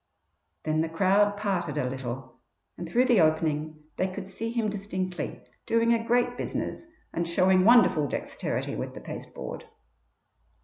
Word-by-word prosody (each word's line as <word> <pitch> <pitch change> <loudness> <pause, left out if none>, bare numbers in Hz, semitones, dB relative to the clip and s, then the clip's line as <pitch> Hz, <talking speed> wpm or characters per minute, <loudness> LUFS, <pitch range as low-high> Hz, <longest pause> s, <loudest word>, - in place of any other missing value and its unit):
Then 155 0 +1
the 160 - -1
crowd 200 +4 +3
parted 180 -7 -1
a 130 - 0
little, 130 -1 -6 0.4
and 170 -1 -7
through 245 +8 +3
the 240 -7 +5
opening 155 -1 +1
they 185 - +1
could 185 0 -6
see 225 +4 -4
him 230 -2 0
distinctly, 190 -4 -4 0.2
doing 230 +1 +3
a 230 -1 +1
great 245 +1 +2
business 335 - -4 0.3
and 170 0 -1
showing 185 +2 +4
wonderful 230 -11 +6
dexterity - - -3
with - - -5
the - - -6
pasteboard. - - -7
185 Hz, 145 wpm, -27 LUFS, 155-220 Hz, 0.4 s, wonderful